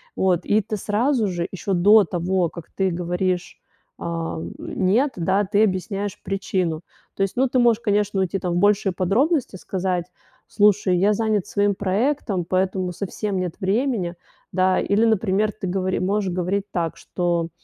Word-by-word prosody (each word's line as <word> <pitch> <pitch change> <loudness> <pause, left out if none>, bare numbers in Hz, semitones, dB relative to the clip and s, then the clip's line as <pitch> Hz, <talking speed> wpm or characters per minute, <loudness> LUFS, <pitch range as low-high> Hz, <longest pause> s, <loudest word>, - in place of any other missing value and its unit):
вот. 185 -2 +1
И 215 +1 +3
ты 215 +1 -4
сразу 220 +4 +1
же, 175 -2 -2
ещё 190 +1 -3
до 205 +3 +6
того, 175 +1 0
как 170 -3 -11
ты 190 -2 0
говоришь, 180 +1 -2 0.4
ам, 165 -1 -4
"нет", 225 +10 +1
да, 190 +4 +1
ты 205 +2 +2
объясняешь 200 0 -2
причину. 185 -4 -2 0.3
То 195 - 0
есть, 195 - -2
ну 260 0 +3
ты 255 - +2
можешь, 235 -1 +4
конечно, 205 -2 +1
уйти 190 +1 -1
там 180 -2 -2
в - - 0
большие 200 0 +3
подробности, 235 - +1
сказать: 180 -2 -2 0.4
"Слушай, 205 -3 +3
я 200 +4 +3
занят 215 -2 0
своим 205 0 +1
проектом, 205 - 0
поэтому 185 0 0
совсем 200 +1 -3
нет 180 -2 -3
времени". 200 -3 0 0.4
Да, 185 0 +3
или, 205 +3 +2
например, 215 -1 +2
ты 195 -3 -5
говори 185 0 -1
можешь 195 0 0
говорить 185 +3 -1
так, 165 -2 -2
что, 170 -2 -1
190 Hz, 160 wpm, -22 LUFS, 180-210 Hz, 0.4 s, до